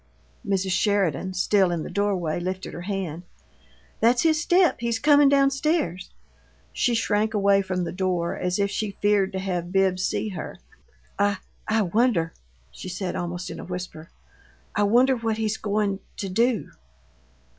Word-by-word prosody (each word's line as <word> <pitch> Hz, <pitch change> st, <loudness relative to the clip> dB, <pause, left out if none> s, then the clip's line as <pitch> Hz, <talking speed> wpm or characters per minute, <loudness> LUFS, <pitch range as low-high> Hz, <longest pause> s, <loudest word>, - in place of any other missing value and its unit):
Mrs. 195 Hz, -1 st, -1 dB
Sheridan, 185 Hz, -3 st, +1 dB
still 190 Hz, +1 st, +3 dB
in 170 Hz, -2 st, -2 dB
the -, -, -6 dB
doorway, 185 Hz, -5 st, 0 dB
lifted 185 Hz, +1 st, -4 dB
her 175 Hz, -, -6 dB
hand. 180 Hz, -4 st, -4 dB, 0.8 s
"That's 240 Hz, +2 st, +3 dB
his 315 Hz, -2 st, +3 dB
step 355 Hz, +1 st, +3 dB
he's 235 Hz, -1 st, -1 dB
comin' 290 Hz, +2 st, +5 dB
down 275 Hz, -1 st, +4 dB
stairs." 270 Hz, -, -1 dB, 0.6 s
She 245 Hz, -2 st, +1 dB
shrank 215 Hz, 0 st, +1 dB
away 200 Hz, -1 st, +4 dB
from 185 Hz, -2 st, -2 dB
the 170 Hz, -, -3 dB
door 180 Hz, -2 st, -1 dB
as 180 Hz, 0 st, -1 dB
if 200 Hz, -1 st, 0 dB
she 205 Hz, -2 st, -3 dB
feared 205 Hz, -2 st, +2 dB
to -, -, -2 dB
have 180 Hz, -2 st, -3 dB
Bibbs 190 Hz, -1 st, +2 dB
see 215 Hz, -, -1 dB
her. 185 Hz, -, -6 dB, 0.6 s
"I 205 Hz, 0 st, +2 dB, 0.3 s
I 215 Hz, 0 st, +2 dB
wonder 195 Hz, -4 st, +1 dB, 0.2 s
" 60 Hz, 0 st, -35 dB
she 185 Hz, -, -8 dB
said, 180 Hz, 0 st, -4 dB
almost 175 Hz, +1 st, -4 dB
in -, -, -7 dB
a -, -, -7 dB
whisper 180 Hz, -3 st, -7 dB, 0.7 s
"I 210 Hz, -, +1 dB
wonder 250 Hz, +5 st, +4 dB
what 225 Hz, -2 st, -2 dB
he's 220 Hz, -1 st, -1 dB
goin' 205 Hz, -2 st, -1 dB, 0.2 s
to 195 Hz, -, -4 dB
do." 230 Hz, +4 st, +1 dB
195 Hz, 165 wpm, -25 LUFS, 180-220 Hz, 0.8 s, comin